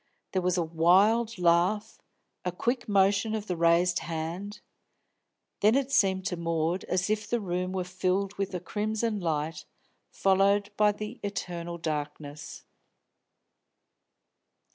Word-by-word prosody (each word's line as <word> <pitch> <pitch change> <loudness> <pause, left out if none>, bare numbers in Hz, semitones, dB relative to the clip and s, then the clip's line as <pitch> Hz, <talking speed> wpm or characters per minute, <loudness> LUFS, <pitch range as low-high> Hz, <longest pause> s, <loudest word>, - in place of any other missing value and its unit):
There 190 - 0
was 180 0 +1
a 175 - +2
wild 195 +8 +3
laugh, 180 +5 +2 0.4
a 180 - -1
quick 240 +7 -2
motion 200 +2 +3
of 210 -1 -4
the 180 - -2
raised 170 +1 +3
hand 170 +6 -5 1.0
then 215 +3 +4
it 275 0 0
seemed 190 -6 +2
to 180 - -1
Maud 165 +1 -1
as 180 0 0
if 215 -1 -1
the 240 - +1
room 180 -2 -2
were 185 -1 -2
filled 185 +2 -1
with 195 -1 -3
a - - -2
crimson 215 +3 -2
light, 155 -2 -2 0.5
followed 200 +1 +2
by 210 0 +4
the 210 +3 -7
eternal 175 -4 -4
darkness. 150 -2 -5
185 Hz, 130 wpm, -28 LUFS, 170-210 Hz, 1.0 s, then